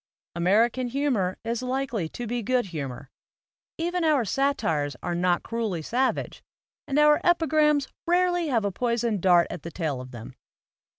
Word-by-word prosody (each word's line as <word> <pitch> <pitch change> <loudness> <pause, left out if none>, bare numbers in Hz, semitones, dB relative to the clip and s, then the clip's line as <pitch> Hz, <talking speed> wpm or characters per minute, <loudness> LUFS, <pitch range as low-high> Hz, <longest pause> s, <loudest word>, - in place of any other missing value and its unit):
American 220 +9 +2
humor 240 -8 0
is 230 +1 -2
likely 250 -8 -2
to 240 - -6
be 240 +1 -2
good 250 +2 +1
humor; 140 -2 -6 0.7
even 345 +1 -1
our 300 -7 +3
satires 165 - 0
are 175 - -2
not 175 0 +1
cruelly 220 -8 -3
savage, 255 +9 -1 0.5
and 275 - -1
our 300 0 +5
epigrams 310 -4 +3 0.2
rarely 355 -1 +2
have 230 -7 +1
a 200 - 0
poisoned 235 -1 -1
dart 175 -2 +5
at 175 - -6
the 170 - -7
tail 155 -6 -3
of 130 - -10
them. 120 +1 -10
235 Hz, 155 wpm, -26 LUFS, 175-280 Hz, 0.7 s, our